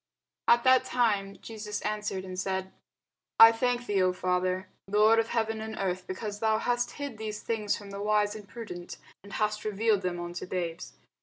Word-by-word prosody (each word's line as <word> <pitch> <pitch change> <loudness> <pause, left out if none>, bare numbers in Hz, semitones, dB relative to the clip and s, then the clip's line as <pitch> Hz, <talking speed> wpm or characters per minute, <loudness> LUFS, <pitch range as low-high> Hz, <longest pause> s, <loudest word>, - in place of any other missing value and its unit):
At 235 0 +5
that 260 0 +6
time 205 -5 0
Jesus 210 -2 -5
answered 210 -3 -3
and 185 -1 -6
said, 190 0 -2 0.7
I 225 0 +11
thank 245 +1 0
thee, 200 -3 +1
O 185 0 +3
Father, 185 +1 0 0.2
Lord 215 +3 +5
of 225 - +1
heaven 225 -1 -1
and 220 0 -5
earth, 185 -1 -2
because 205 +2 -5
thou 220 -1 +2
hast 245 +2 0
hid 285 -6 -6
these 215 -1 -4
things 215 -3 -1
from 200 -1 -11
the 200 0 -6
wise 210 0 +2
and 210 -2 -10
prudent, 180 -7 -8 0.3
and 200 - -12
hast 210 0 -1
revealed 215 -1 +1
them 180 -2 -2
unto 175 +1 -5
babes. 175 -2 -4
210 Hz, 180 wpm, -29 LUFS, 190-225 Hz, 0.7 s, I